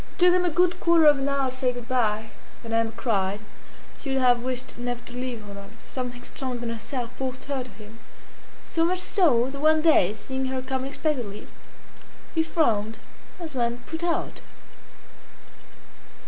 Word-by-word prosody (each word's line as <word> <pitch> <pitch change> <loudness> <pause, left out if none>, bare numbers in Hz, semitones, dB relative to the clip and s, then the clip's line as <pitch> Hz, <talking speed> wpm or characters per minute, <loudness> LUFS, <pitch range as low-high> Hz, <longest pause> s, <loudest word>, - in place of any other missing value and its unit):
It - - -23
took 360 -1 +6
them 360 0 +3
a - - +3
good 355 +2 +2
quarter 335 -2 +5
of 295 -2 +7
an 270 +1 0
hour 275 -2 +1
to - - -9
say 255 -1 +1
goodbye. 235 -3 -1 0.3
Then 230 -1 -5
Emma 225 0 +2
cried. 205 -4 0 0.6
She 280 - -6
would 270 - +1
have 245 -2 +4
wished 255 -1 -4
never 245 0 -2
to 245 - -6
leave 245 -4 -4
Rodolphe. 200 +2 -10 0.2
Something 245 -1 -4
stronger 255 -2 -4
than 235 -1 -3
herself 230 +1 -4
forced 260 -1 -4
her 275 -2 -2
to 250 - -12
him; 215 +1 -13 0.7
so 330 - +3
much 360 +2 +2
so, 270 - +3
that 280 - -6
one 310 0 +4
day, 305 - +5
seeing 265 +4 -4
her 260 0 -2
come 260 0 -2
unexpectedly, 260 -6 -3 0.9
he 325 - +3
frowned 225 -10 +1 0.4
as 325 -3 -6
one 240 -2 0
put 320 +1 -5
out. 345 -1 -1
255 Hz, 175 wpm, -26 LUFS, 230-290 Hz, 0.9 s, of